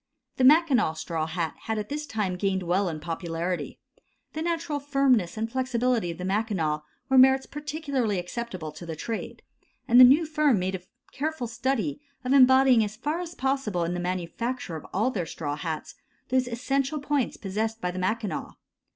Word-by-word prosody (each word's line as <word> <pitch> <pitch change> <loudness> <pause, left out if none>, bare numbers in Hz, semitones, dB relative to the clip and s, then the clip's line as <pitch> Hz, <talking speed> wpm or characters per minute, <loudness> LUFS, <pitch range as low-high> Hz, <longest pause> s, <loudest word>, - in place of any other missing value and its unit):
The 260 - +1
Mackinaw 270 - +5
straw 160 0 -3
hat 160 0 -2
had 220 -1 -1
at 210 -1 -4
this 300 +1 -4
time 210 -7 -1
gained 190 0 -1
well 180 +2 +1
in 155 -2 -5
popularity; 170 +2 -3 0.6
the 315 - -4
natural 330 -3 -1
firmness 270 -10 +2
and 220 +1 -1
flexibility 250 -4 0
of 170 - -5
the 180 - -5
Mackinaw 190 -7 0 0.3
were 265 -1 +5
merits 265 +1 +6
particularly 285 - -2
acceptable 180 -3 -5
to 155 +3 -10
the 165 - -4
trade, 225 +8 -5 0.4
and 240 +1 +6
the - - +12
new 280 +6 +7
firm 300 -5 +2
made 185 +1 -1
a 190 - -4 0.3
careful 305 -2 -3
study 260 +4 -2 0.2
of 255 - +2
embodying 260 -3 +6
as 210 0 -4
far 295 +8 -2
as 345 -1 -6
possible 265 -9 -1
in 170 +1 -1
the 180 - -3
manufacture 185 +4 -3
of 155 - -8
all 220 +7 +1
their 180 -8 -3
straw 145 -3 -4
hats, 155 +1 -5 0.4
those 255 0 +2
essential 270 +5 -1
points 285 -2 -1
possessed 220 +3 -3
by 180 -3 -2
the 180 - -5
Mackinaw. 210 +2 -2
225 Hz, 175 wpm, -26 LUFS, 180-270 Hz, 0.6 s, the